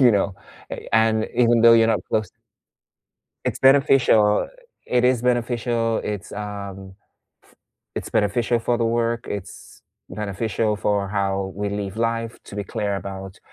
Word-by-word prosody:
You 125 -2 +7
know, 100 -1 +1 0.4
eh, - - -7
and 110 0 +3
even 120 -1 +4
though 115 0 +8
you're 115 -1 +6
not 110 - +2
close 110 -4 0 1.2
it's - - -1
beneficial 135 -6 +4 0.4
it 125 0 +1
is 125 -2 +3
beneficial, 120 -2 0
it's 105 -2 -5
um, 100 -2 -7 0.5
f - - -25 0.4
it's - - -5
beneficial 115 +3 +1
for 120 +1 0
the 115 - 0
work, 115 0 0
it's 100 -2 -8 0.3
beneficial 105 +1 -2
for 100 0 0
how 95 -1 -1
we 100 +1 -2
live 100 -1 -4
life 115 0 -1
to 100 - -10
be 100 - -3
clear 100 0 -2
about 95 0 -7
110 Hz, 145 wpm, -22 LUFS, 100-115 Hz, 1.2 s, though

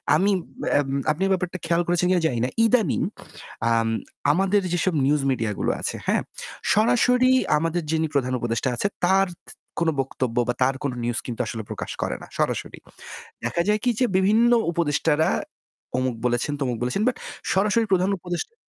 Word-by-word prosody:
আমি 195 +6 +3 0.8
আপনি 155 +4 -4
এই - - 0
ব্যাপারটা 180 -1 -2
খেয়াল 170 +1 +2
করেছেন 175 0 +1
কিনা 180 -2 +3
জানি 120 -6 -2
না। - - -1 0.2
ইদানিং 225 -1 +2 0.7
আম 115 0 +2 0.4
আমাদের 195 +5 +2
যেসব 175 +1 +1
নিউজ 145 +1 +2
মিডিয়াগুলো 115 -5 -1
আছে, - - -2
হ্যাঁ, - - +2 0.5
সরাসরি 250 +3 +4 0.3
আমাদের 165 +3 -1
যিনি 160 0 +1
প্রধান 130 -3 0
উপদেষ্টা 120 +2 -1
আছে 200 - 0 0.2
তার 195 +2 +4 0.5
কোন 165 -1 +2
বক্তব্য 130 -2 -3
বা 125 - +1
তার 130 +1 +3
কোন 140 - 0
নিউজ 120 0 0
কিন্তু 120 -1 -3
আসলে 110 0 -4
প্রকাশ - - -5
করে - - -1
না। - - -10
সরাসরি। - - -2 0.6
দেখা 170 - 0
যায় 210 0 +3
কি 250 - +2
যে 255 - +4
বিভিন্ন 220 +5 +4 0.2
উপদেষ্টারা 160 -1 +1 0.7
অমুক 130 -1 0
বলেছেন, 120 +4 0
তমুক 125 -3 -1
বলেছেন 125 +11 -1
বাট 255 - +2 0.4
সরাসরি 210 +4 +2
প্রধান 185 0 +3
উপদেষ 175 - -5
170 Hz, 160 wpm, -24 LUFS, 130-195 Hz, 0.8 s, সরাসরি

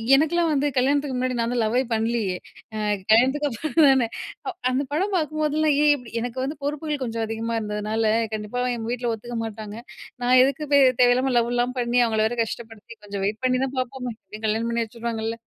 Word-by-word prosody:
எனக்லாம் 325 +4 +2
வந்து 290 -1 +1
கல்யாணத்துக்கு 275 +1 +1
முன்னாடி 255 0 -1
நான் 230 +1 0
தான் 245 - +1
லவ்வே 230 +4 +2
பண்ணலியே. 225 -4 0 0.4
அ - - -3 0.3
கல்யாணத்துக்கு 265 +6 +4
அப்புறம் 295 +5 +2
தானே. 260 -3 +3 0.6
அந்த 260 +2 0
படம் 385 +7 0
பார்க்குபோதெல்லாம், 310 -1 +1
ஏன் 295 - +6
இப்டி 245 -5 -11
எனக்கு 245 +1 -4
வந்து 280 +3 -3
பொறுப்புகள் 295 -1 -2
கொஞ்சம் 230 -1 -2
அதிகமா 225 +1 -3
இருந்ததுனால 215 +1 -1 0.2
கண்டிப்பா 215 +3 -3
எங்க 225 -1 -5
வீட்ல 240 -1 -1
ஒத்துக்க 235 +2 -6
மாட்டாங்க. 215 -1 -7 0.5
நான் 250 +1 +5
எதுக்கு 275 +3 0 0.4
தேவையில்லாம 250 +2 +4
லவ்லாம் 240 +2 0
பண்ணி 240 0 +1
அவங்கள 220 -1 +1
வேறு 240 +2 -5
கஷ்டப்படுத்தி, 225 0 -8
கொஞ்சம் 200 -1 -5
வெயிட் 210 +4 -2
பண்ணி 255 0 +2
தான் 270 0 -6
பார்ப்போமே, 255 -1 -4
எப்டியும் 215 +1 -8
கல்யாணம் 225 +2 0
பண்ணி 235 0 0
வச்சுருவாங்கல்ல, 230 0 -4
240 Hz, 175 wpm, -24 LUFS, 225-270 Hz, 0.6 s, ஏன்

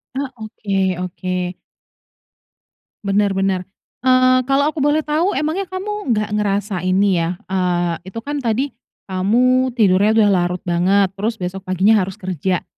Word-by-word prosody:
Ah, 275 0 -2
oke 215 -2 -5 0.3
oke. 180 0 -3 1.5
Benar 200 0 +1
benar, 190 -1 0 0.4
eee, 255 0 +5
kalau 275 +1 +3
aku 315 - -6
boleh 295 +2 +2
tahu, 320 +6 0
emangnya 315 +7 -1
kamu 375 - -2
nggak 215 0 -1
ngerasa 200 -1 -1
ini, 190 -1 +3
ya, 165 +2 -1 0.2
eee, 175 -2 0
itu 190 +4 -6
kan, 290 0 -3
tadi 255 +3 -1 0.4
kamu 250 +7 +2
tidurnya 205 -1 +3
udah 215 -2 +5
larut 180 -1 0
banget, 185 +2 +2
terus 210 +4 -2
besok 190 -1 -6
paginya, 195 +4 +4
harus 190 +1 -3
kerja. 185 -2 -2
205 Hz, 140 wpm, -19 LUFS, 185-255 Hz, 1.5 s, eee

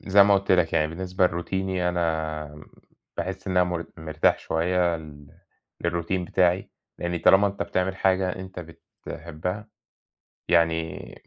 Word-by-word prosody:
زي 100 +1 +6
ما 100 0 +5
قُلت 100 0 +2
لك 90 -3 +3
يعني 75 - +3
بالنسبة 90 +3 0
لروتيني 90 +1 -2
أنا 80 -3 -2 0.5
باحس 95 +1 -4
إن 95 -1 -2
أنا 90 - +6
مر 90 -1 -3
مرتاح 80 -1 +1
شوية 85 +1 +1
ال 75 -2 -12 0.6
للروتين 85 +2 -1
بتاعي، 90 +1 +1 0.3
يعني 85 0 -2
طالما 95 +4 +6
أنت 100 0 -2
بتعمل 95 +1 -1
حاجة 95 -1 +1
أنت 95 -1 -7 0.5
بتحبّها 90 +6 -5 0.8
يعني 80 -1 +1
90 Hz, 135 wpm, -25 LUFS, 80-95 Hz, 0.8 s, زي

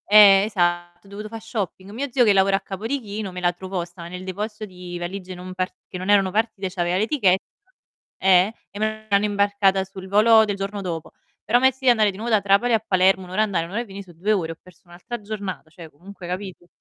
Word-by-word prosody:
Eh 200 -2 +8
esatto, 175 -3 -1
ho - - -17
dovuto 205 +2 -7
fa' 225 +1 -7
shopping. 200 -3 -5
Mio 265 +7 -3
zio 255 0 +4
che 210 - +5
lavora 195 0 +4
a - - -7
Capodichino, 210 0 -4
me 180 - -6
la 175 0 +1
trovò, 185 0 -4
stava 170 -1 -11
nel 180 +1 -8
deposito 210 +3 -5
di 180 -2 -8
valigie 185 +1 -6
non 180 +1 -8
part 185 0 -3
che 185 - -7
non 185 +2 -5
erano 195 -2 +4
partite, 205 -2 -1
c'aveva 175 -1 -1
l'etiche 205 -4 +3 0.9
eh 190 +2 +5 0.2
e 205 - -9
me 215 0 -2
l'hanno 200 +1 +3
imbarcata 200 -1 +2
sul 190 0 -10
volo 220 +3 +6
del 205 -1 -2
giorno 200 +1 -4
dopo. 165 -4 -5 0.3
Però 230 +4 +3
a - - -6
me 260 - +6
è - - -5
sì, 265 0 0
andare 215 -4 +4
di 190 - -12
nuovo 230 +3 -4
da 215 - +5
Trapani 200 +5 +3
a 225 - +4
Palermo, 190 0 +3
1 180 - -12
ora 200 +3 +1
a - - +5
andare, 180 -6 -1
1 170 - -11
ora 220 +4 -1
a - - -7
venì, 200 -1 -9
so' 180 -2 -16
2 185 +6 -1
ore, 170 -5 -1
ho - - -21
perso 185 -2 -19
un'altra 175 +7 -8
giornata, 200 -5 -6
cioè 165 0 -12
comunque 180 +4 -12
capito? 180 -1 -6
195 Hz, 245 wpm, -23 LUFS, 180-210 Hz, 0.9 s, Eh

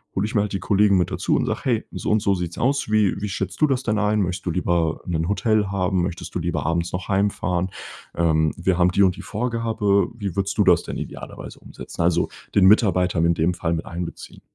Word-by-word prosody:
hole 95 - 0
ich 110 - -5
mir 105 - +4
halt 105 - -2
die 95 - -1
Kollegen 100 -1 +3
mit 90 - +1
dazu - - 0
und - - 0
sage:„ - - -3
Hey, 115 -4 0
so - - -4
und 110 - +3
so 100 -2 +2
sieht's 90 -1 -5
aus, 135 -3 0
wie 105 -2 +2
wie 105 - -2
schätzt 95 - -4
du - - +7
das 135 -2 0
denn 110 -4 0
ein? 105 0 +1
Möchtest 90 -1 -3
du 90 - 0
lieber 85 -2 0
'nen 85 0 -1
Hotel 110 -1 +1
haben? 95 -1 0
Möchtest 90 -1 -5
du - - 0
lieber - - -2
abends 85 +2 -1
noch 90 0 -4
heimfahren? 95 -2 0 0.5
Ähm. 80 -1 +2 0.2
Wir 90 0 0
haben 90 0 +4
die 100 +2 +3
und 90 -2 +3
die - - -9
Vorgabe. 110 -3 0
Wie 100 -6 -5
würdest 100 0 -2
du 105 - +4
das 90 -1 +5
denn - - -6
idealerweise - - -8
umsetzen?“ - - -8
Also, 85 -1 +2 0.3
den 100 - +5
Mitarbeiter 95 -4 +4
in 85 +1 +3
dem 85 +3 +1
Fall 85 -1 -2
mit 80 - -3
einbeziehen? 85 0 -7
95 Hz, 235 wpm, -22 LUFS, 90-105 Hz, 0.5 s, du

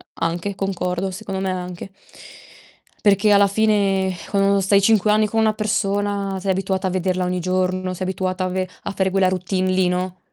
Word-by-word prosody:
A - - -2
Anche, 175 +4 -2
concordo, 190 -1 -2
secondo 190 0 -5
me 190 0 -1
anche. 180 +1 -6 1.1
Perché 205 +1 +4
alla 200 0 +6
fine, 200 -2 +2
ecco, 195 +2 0
stai 195 +1 +3
5 210 0 +3
anni 215 0 +3
con 225 +2 -1
una 220 -1 +3
persona 200 -2 -1
sei 195 +1 -1
abituata 190 0 -1
a - - 0
vederla 185 0 -1
ogni 180 0 -1
giorno, 185 +1 -1
sei 185 +1 -4
abituata 185 0 -2
a - - 0
ve 185 0 -2 0.2
a - - -3
fare 190 -1 0
quella 190 -1 +3
routine 185 0 -1
lì, 185 -1 +2
no? 180 0 -2
190 Hz, 185 wpm, -21 LUFS, 185-200 Hz, 1.1 s, alla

